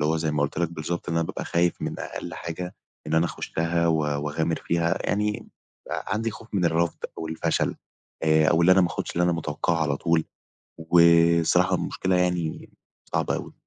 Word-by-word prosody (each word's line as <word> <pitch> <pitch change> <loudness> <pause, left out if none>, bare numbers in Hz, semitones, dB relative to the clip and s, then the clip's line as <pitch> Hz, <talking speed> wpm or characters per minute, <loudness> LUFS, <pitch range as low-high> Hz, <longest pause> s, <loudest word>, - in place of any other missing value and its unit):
اللي 75 +2 +2
هو - - +1
زي 80 -1 -1
ما 75 -1 0
قُلت 75 +2 -2
لك 85 -2 +1
بالضبط، 85 +2 -4
إن 85 - -1
أنا 85 0 +2
بابقى - - -5
خايف 85 0 0
من - - -3
أقل - - -6
حاجة 90 +3 -6 0.3
إن 75 - -1
أنا 80 +1 +4
اخشّها، 85 0 -1
و 80 -1 +3
واغامر 75 +2 -1
فيها، 85 0 0
يعني 105 +1 -1 0.4
آآ، - - -3
عندي 110 +3 -1
خوف 110 +1 -12
من 95 -3 +1
الرفض 85 0 +1 0.2
أو 80 - -4
الفشل، 80 0 0 0.5
آآ، 80 -1 +4
أو 80 - +3
اللي 90 - +7
أنا 95 - +5
ماخدش 90 -2 -1
اللي 90 - +1
أنا 90 - +2
متوقعه 85 +1 -1
على 75 -3 0
طول، 85 +1 +1 0.5
وصراحة 85 0 +4
المشكلة 95 0 -1
يعني 90 -3 -1 0.4
صعبة - - +1
أوي. - - -7
85 Hz, 190 wpm, -25 LUFS, 80-85 Hz, 0.5 s, اللي